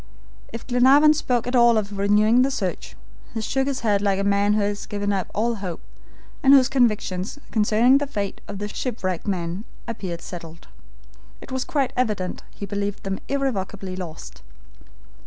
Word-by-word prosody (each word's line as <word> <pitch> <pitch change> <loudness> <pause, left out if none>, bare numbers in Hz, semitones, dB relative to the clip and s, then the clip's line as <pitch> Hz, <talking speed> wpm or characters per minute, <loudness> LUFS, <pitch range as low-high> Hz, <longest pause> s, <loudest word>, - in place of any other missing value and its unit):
If 230 - -7
Glenarvan 265 +5 +6
spoke 250 -6 0
at 250 +1 -2
all 235 -2 +6
of 205 -1 -2
renewing 210 +4 +4
the 265 - +3
search, 275 - -4 0.4
he 225 - -1
shook 265 +5 0
his 275 -2 -2
head 205 -3 +2
like 200 -2 +1
a 200 - -1
man 200 +1 +2
who 210 - +2
has 205 0 -2
given 205 0 -2
up 190 -2 -2
all 230 +3 +1
hope, 180 -4 -4 0.6
and 275 0 +7
whose 265 -1 +5
convictions 215 -5 0
concerning 225 +5 +4
the 290 - -2
fate 205 -7 -4
of - - -6
the 205 +1 -4
shipwrecked 205 -6 -3
men 180 0 -2 0.2
appeared 190 -7 -5
settled. 165 -2 -9 0.7
It - - -12
was 260 0 -1
quite 285 -6 -1
evident 210 -7 -1
he 200 - -8
believed 200 0 -3
them 195 0 -3
irrevocably 205 -9 -2
lost. 170 - -8
210 Hz, 170 wpm, -23 LUFS, 195-250 Hz, 0.7 s, and